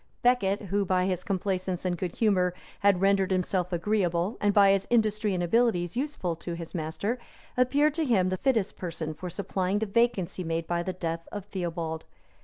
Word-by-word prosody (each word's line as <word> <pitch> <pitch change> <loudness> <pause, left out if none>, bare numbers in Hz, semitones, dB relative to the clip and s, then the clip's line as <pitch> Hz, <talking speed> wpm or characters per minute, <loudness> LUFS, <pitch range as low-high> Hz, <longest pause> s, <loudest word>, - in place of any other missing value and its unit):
Becket, 215 -5 +3
who, 200 +1 0
by 185 -1 +1
his 185 -2 -1
complaisance 185 -3 -2
and 180 -1 +1
good 175 0 -4
humor, 185 -5 +2 0.2
had 200 -3 +3
rendered 195 -1 +3
himself 185 -1 0
agreeable, 175 +1 0
and 205 - +3
by 200 -1 +6
his 195 0 +1
industry 215 -3 +2
and 175 - -1
abilities 180 -3 +2
useful, 250 - -2
to 170 +1 -5
his 170 -1 -8
master, 170 +8 -2 0.4
appeared 280 +4 +3
to 320 0 0
him 195 -8 +3
the 185 - -1
fittest 225 -4 +1
person 165 -3 -4
for 180 +4 -6
supplying 190 +1 -1
the 220 - 0
vacancy 205 -4 +1
made 165 0 -2
by 170 +1 -1
the 185 - -2
death 165 -2 -4
of 205 -2 -6
Theobold. 170 -4 -4
190 Hz, 185 wpm, -28 LUFS, 175-210 Hz, 0.4 s, by